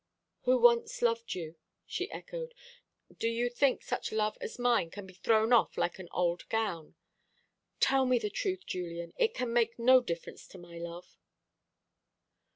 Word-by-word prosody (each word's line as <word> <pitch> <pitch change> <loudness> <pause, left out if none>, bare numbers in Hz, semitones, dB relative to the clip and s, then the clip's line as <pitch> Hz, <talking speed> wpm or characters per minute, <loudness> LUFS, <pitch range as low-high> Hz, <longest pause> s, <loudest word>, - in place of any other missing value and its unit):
"Who 255 +1 +5
once 235 0 +4
loved 230 -1 +1
you," 165 -2 -6 0.3
she - - -3
echoed. - - -7 0.6
"Do - - +1
you 235 +1 0
think 265 +1 +2
such - - -3
love 215 -1 0
as - - -6
mine 240 -8 +2
can 200 +3 -9
be 190 - -13
thrown 220 +5 +2
off 235 - +4
like 175 - -1
an 185 - -8
old 175 -1 -1
gown? 195 -9 -2 0.8
Tell 265 -1 +3
me 250 -1 +4
the 210 -3 -2
truth, 375 - -2
Julian 170 -1 -5
it 455 -1 +2
can 245 -2 -2
make 230 -1 +2
no 255 +2 +6
difference 170 -8 -6
to - - -13
my 175 -1 -11
love." 170 +1 -9
225 Hz, 160 wpm, -31 LUFS, 175-245 Hz, 0.8 s, no